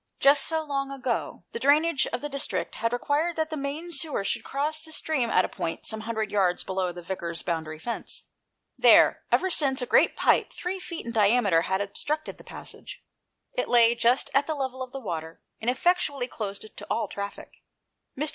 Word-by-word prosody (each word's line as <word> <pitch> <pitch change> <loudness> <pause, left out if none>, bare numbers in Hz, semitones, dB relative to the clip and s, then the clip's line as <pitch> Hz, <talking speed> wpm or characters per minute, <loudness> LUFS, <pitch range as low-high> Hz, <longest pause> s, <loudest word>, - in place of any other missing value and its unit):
Just 280 0 +5
so 320 -1 0
long 275 -2 -2
ago 260 -3 -3
the 465 - -5
drainage 305 -3 +3
of 245 - -3
the 295 - -3
district 280 -1 -2
had 230 +1 -1
required 290 +7 0
that 315 0 -1
the - - -2
main 295 +4 -4
sewer 315 - 0
should 195 - -1
cross 305 +3 -1
the 315 0 -10
stream 300 -6 0
at 185 - +4
a - - -2
point 165 - -4
some 220 - -1
hundred 220 -1 -3
yards 185 -4 +2
below 185 -1 -1
the 175 0 -9
Vicar's 170 -2 -4
boundary 160 -3 -3
fence. 235 +9 -4 0.6
There, - - +6
ever 375 - +3
since, 275 -5 +2
a 250 - 0
great - - +4
pipe - - +3
three 370 +2 -4
feet 340 -6 -7
in 235 - -4
diameter 210 -5 +4
had 190 +3 0
obstructed 300 +10 -3
the - - -13
passage. - - -10 0.5
It - - -2
lay 235 -1 +6
just 240 +2 +2
at 280 +1 +3
the 315 - -1
level 260 -2 -3
of 255 -1 -5
the 270 - -5
water, 165 -7 -5 0.2
and 225 - 0
effectually 285 -2 +1
closed 200 -5 -5
it 215 - -14
to - - -8
all 230 - 0
traffic. 200 0 -7 0.6
Mr. 300 +3 0
255 Hz, 200 wpm, -27 LUFS, 205-300 Hz, 0.6 s, There